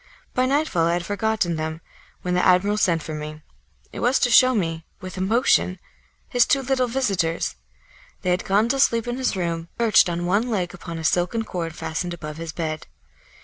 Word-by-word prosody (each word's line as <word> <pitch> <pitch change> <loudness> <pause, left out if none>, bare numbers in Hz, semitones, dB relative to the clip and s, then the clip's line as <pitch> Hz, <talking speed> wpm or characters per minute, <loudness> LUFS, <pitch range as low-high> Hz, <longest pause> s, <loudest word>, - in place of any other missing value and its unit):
By 255 0 +2
nightfall 270 - +1
I 170 - +2
had 175 0 -2
forgotten 205 -3 0
them, 160 0 -3 0.4
when 180 - -1
the 180 - +2
admiral 185 +3 +4
sent 170 -6 +2
for 155 - -6
me. 155 0 -7 0.5
It - - -6
was 250 +2 +3
to 245 - +3
show 255 +1 +6
me, 165 -5 -1 0.2
with 185 -2 -8
emotion, 190 -1 +2 0.5
his 245 -2 +3
two 275 -1 +2
little 255 -1 +1
visitors; 195 -10 -1 0.7
they 180 - +1
had 180 - 0
gone 205 +4 +2
to 275 - 0
sleep 230 -3 +3
in 240 +1 -2
his 260 -4 0
room, 170 -2 -2
perched 225 -6 +4
on 175 0 -2
one 205 +7 +1
leg 185 -6 -1
upon 170 -3 -7
a 160 - -6
silken 180 +7 +1
cord 170 -6 -4
fastened 175 +2 -3
above 150 -2 -8
his 165 -1 -5
bed. 155 -1 -4
185 Hz, 190 wpm, -23 LUFS, 165-230 Hz, 0.7 s, show